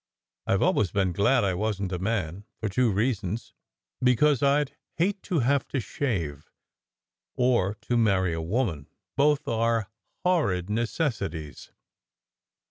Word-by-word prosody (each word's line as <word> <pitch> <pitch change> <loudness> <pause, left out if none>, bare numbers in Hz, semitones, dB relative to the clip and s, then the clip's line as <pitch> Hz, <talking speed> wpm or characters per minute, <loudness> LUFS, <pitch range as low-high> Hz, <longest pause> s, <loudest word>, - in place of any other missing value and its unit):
I - - +3
ve - - +2
always 100 - +2
been 95 -1 +1
glad 105 +7 +3
I 95 -2 +1
wasn 100 0 -1
t 90 - -3
a - - -4
man, 95 -2 -2 0.2
for 110 - -2
two 125 +4 +2
reasons: 105 0 -1 0.5
because 125 +2 +4
I 140 +1 +4
d 140 - -11 0.2
hate 190 +4 +1
to 170 -6 0
have 135 +3 +1
to 135 - -2
shave, 85 - -3 0.9
or 120 -6 +2
to 120 - 0
marry 95 -6 +2
a 80 - -2
woman. 85 - -1 0.3
Both 145 +1 +2
are 115 -2 0 0.3
horrid 100 - +1
necessities." 105 - -2
110 Hz, 140 wpm, -27 LUFS, 95-130 Hz, 0.9 s, because